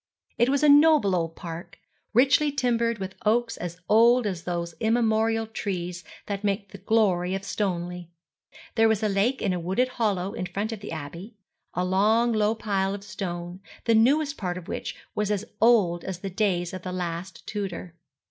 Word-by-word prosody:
It 240 - +4
was 280 +1 +1
a - - +6
noble 290 -8 +6
old 165 -2 -2
park, 170 -1 -8 0.3
richly 275 +5 +4
timbered 235 -4 +1
with 190 -1 -5
oaks 230 +2 +2
as 175 -1 -5
old 235 +3 +5
as 185 -5 -3
those 170 -1 -3
immemorial 225 -1 +2
trees 180 -5 -4 0.2
that 200 0 -4
make 200 -1 -1
the 200 - -10
glory 190 -3 +2
of 195 - -4
Stoneleigh. 180 -4 -3 0.7
There 225 -1 +4
was 220 -1 +1
a - - +3
lake 210 +6 +1
in 190 - +1
a 180 - -2
wooded 190 +9 +1
hollow 205 -6 -1
in 180 - -4
front 200 +5 -3
of 225 - -5
the 205 - -8
Abbey, 165 +7 -7 0.4
a 180 - 0
long 215 +6 +3
low 215 0 +2
pile 200 -3 -1
of 200 - -9
stone, 175 -3 -5 0.3
the 230 - +4
newest 280 +6 +3
part 180 -3 -3
of 180 - -9
which - - -4 0.2
was 210 -1 -1
as 210 0 -1 0.2
old 205 -8 +4
as 185 -2 -5
the 195 - -4
days 180 -3 0
of 185 - -5
the 185 - -5
last 180 +1 -5
Tudor. 190 -4 -5
200 Hz, 185 wpm, -26 LUFS, 180-225 Hz, 0.7 s, a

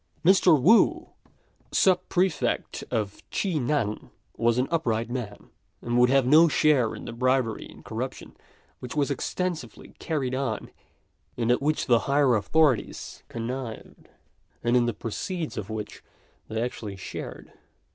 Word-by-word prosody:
Mr. 180 -4 +6
Wu, 235 - +4 0.6
Sub 185 -2 +4
prefect 180 -4 0
of 105 -2 -2
Chi 195 -3 -1
nan, 125 -5 -1 0.3
was 120 0 +2
an 130 +1 +1
upright 115 -8 0
man, 115 -5 -6 0.3
and 120 +2 -3
would 125 0 +5
have 135 -1 +4
no 155 +6 +7
share 145 -7 +3
in - - -9
the 115 - -6
bribery 130 -1 0
and - - -15
corruption - - -6 0.4
which 125 +3 -7
was 145 -1 +1
extensively 175 +5 -4
carried 140 -6 -2
on, 130 -5 -3 0.7
and 120 0 +1
at 125 - +2
which 150 +2 0
the 120 -3 +4
higher 140 -3 +4
authorities 140 +4 +1
connived, 120 0 -6 0.5
and 120 +1 +2
in 120 -1 +3
the 120 - 0
proceeds 165 - -4
of 100 -2 -5
which 110 -1 -6 0.4
they 110 - -3
actually 110 -4 -5
shared. 95 - -8
130 Hz, 140 wpm, -26 LUFS, 115-155 Hz, 0.7 s, no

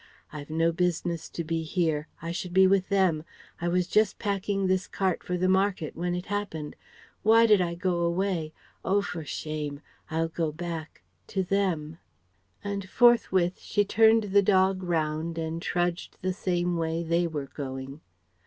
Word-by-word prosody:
"I've 145 -1 -8
no 165 +1 +2
business 170 -1 -1
to 170 - -4
be 165 +1 -2
here. 160 -2 -1 0.2
I 165 - -3
should 175 +1 -5
be 190 0 +7
with 190 0 +3
them. 185 -6 +2 0.4
I 170 - -1
was 180 +1 +2
just 210 +2 +2
packing 200 -1 -1
this 185 0 +1
cart 190 -3 -1
for 180 - -2
the 185 +1 +1
market 190 -4 +1
when 175 +1 -1
it 180 - -4
happened. 200 -7 -4 0.5
Why 225 +2 +6
did 210 -4 +5
I 170 -1 -1
go 180 -1 0
away? 170 -2 0 0.3
Oh 200 +3 +2
for 170 -5 -5
shame! 150 -1 -4 0.3
I'll 165 +1 0
go 165 -2 -1
back 165 - -6 0.2
to 190 - -1
them..." 175 -5 -1 0.6
And 200 -2 -4
forthwith 190 -8 +4
she 205 -1 0
turned 225 +2 +5
the 200 - +7
dog 190 -1 +3
round 165 -1 -1
and 165 0 -3
trudged 175 0 -2
the 185 0 0
same 175 -1 -1
way 165 0 -1
they 170 +1 +1
were 150 -4 -4
going. 135 +1 -6
175 Hz, 165 wpm, -27 LUFS, 160-190 Hz, 0.6 s, be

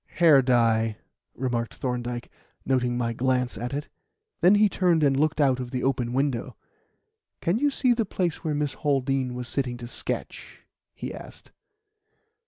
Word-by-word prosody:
"Hair 160 -5 +6
dye," 115 -3 +2 0.4
remarked 120 -2 -2
Thorndyke, 125 -2 -4 0.3
noting 125 -2 +1
my 115 -1 -1
glance 125 +1 0
at 120 +5 -4
it; 145 +2 -4 0.5
then 185 +4 +6
he 210 +1 +5
turned 175 -4 +2
and 140 -2 +4
looked 155 +3 +1
out 135 -3 +3
of 125 -1 -4
the 125 0 -3
open 125 -3 0
window. 135 -2 -1 0.8
"Can 180 +7 0
you 290 +2 +3
see 260 -3 +2
the 230 -1 0
place 180 -5 -2
where 155 -3 -1
Miss 145 -2 -1
Haldean 135 -3 0
was 125 -1 -5
sitting 125 -1 -2
to 120 - -8
sketch?" 120 - -5 0.3
he - - -6
asked. - - -12
130 Hz, 160 wpm, -26 LUFS, 120-150 Hz, 0.8 s, Hair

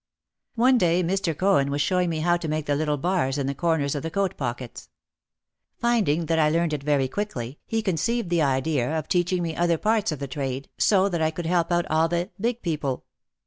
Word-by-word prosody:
One 250 +2 +4
day 175 -1 +2
Mr. 175 -3 -1
Cohen 185 -8 +3
was 140 +1 -1
showing 180 +3 +1
me 160 -2 -2
how 175 +2 +3
to 175 -2 -4
make 155 -1 -2
the 145 - +1
little 150 0 0
bars 145 -4 0
in 140 - -1
the 140 - -1
corners 155 -2 0
of 145 - -3
the 165 - -4
coat 195 +2 -1
pockets. 120 -2 -5 0.9
Finding 205 -10 +1
that 165 0 +1
I 155 -1 +4
learned 165 0 +1
it 145 - -2
very 140 -2 +1
quickly, 135 - -4
he 225 -1 -1
conceived 215 +2 -1
the 170 -2 +3
idea 140 +1 +1
of 155 - -4
teaching 175 0 +1
me 165 -1 -3
other 170 -1 +2
parts 215 +1 +1
of 155 - -3
the 140 - -5
trade 135 0 -4
so 195 -2 +4
that 175 -4 -2
I 160 - +3
could 165 +1 -6
help 170 0 +1
out 175 0 +2
all 160 +1 +2
the 175 +3 -2
"big" 235 +3 -1
people. 150 -6 -2
165 Hz, 220 wpm, -25 LUFS, 145-180 Hz, 0.9 s, One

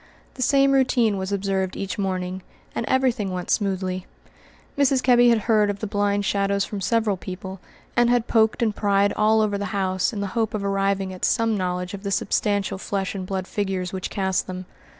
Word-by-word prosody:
The 255 - -8
same 275 +2 +4
routine 245 -6 +2
was 190 +1 -4
observed 195 -1 -1
each 195 +1 -4
morning, 185 -1 -2 0.3
and 230 - -3
everything 255 -6 +1
went 180 -1 -4
smoothly. 185 -2 -1 0.7
Mrs. 275 -2 +2
Kebby 245 -1 +6
had 230 -2 +3
heard 215 -1 +3
of 200 - -2
the 215 - -4
blind 205 0 0
shadows 200 0 +1
from 205 -2 -6
several 220 -1 +1
people, 190 +1 -7 0.4
and 240 -1 +4
had 245 -1 +2
poked 220 +1 +2
and 215 -2 0
pryed 200 -1 +2
about - - -4
all 220 +1 +4
over 205 -2 0
the 200 - -2
house 190 +3 0
in 215 - -5
the 200 - -1
hope 225 -2 0
of 205 - -3
arriving 195 -1 0
at 185 - -11
some 225 -2 +2
knowledge 180 -1 -2
of 200 - -6
the 200 - -4
substantial 200 0 0
flesh 195 -1 -2
and 190 -2 -5
blood 190 -1 -3
figures 190 -2 -3
which 190 -1 -3
cast 190 -2 -1
them. 185 0 -6
200 Hz, 200 wpm, -23 LUFS, 190-220 Hz, 0.7 s, Kebby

